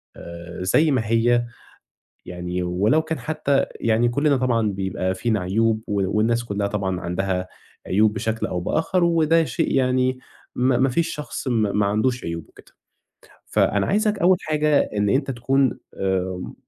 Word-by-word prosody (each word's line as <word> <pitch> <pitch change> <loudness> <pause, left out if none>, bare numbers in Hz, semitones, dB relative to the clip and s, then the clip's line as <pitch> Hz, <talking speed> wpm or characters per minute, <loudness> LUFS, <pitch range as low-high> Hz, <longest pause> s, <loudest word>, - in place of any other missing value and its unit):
آآ، 85 +1 -8
زَي 150 +12 +3
ما 130 -3 +2
هي، 120 +2 +2 0.8
يعني 90 0 -4
ولو 100 - +2
كان 160 0 -4
حتى 145 -3 0 0.2
يعني 115 +1 +2
كُلّنا 140 +3 +2
طبعًا 120 -4 +1
بيبقى 95 -1 -2
فينا 110 -1 0
عيوب 110 +4 +1
و 100 0 -1
والناس 115 +2 +1
كُلّها 100 -3 -2
طبعًا 95 -3 -2
عندها 90 +1 -2 0.4
عيوب 105 +3 +3
بشكل 110 0 -2
أو 90 - -3
بآخر، 165 - 0
وده 165 -1 +3
شيء 165 +1 -1
يعني 130 -1 +1 0.4
ما 125 0 +2
ما 130 +2 +3
فيش 165 +7 0
شخص 150 -1 -6
ما 110 -5 +1
ما 105 0 +1
عندوش 115 +5 0
عيوب 85 -1 -5
وكده. - - -19 0.7
فأنا - - +1
عايزك 210 0 +1
أول 185 0 +4
حاجة 150 -1 +2 0.2
إن 105 0 +2
أنت 135 +4 +1
تكُون 130 +2 +1 0.2
آمم 95 -1 -2
115 Hz, 155 wpm, -22 LUFS, 95-135 Hz, 0.8 s, أول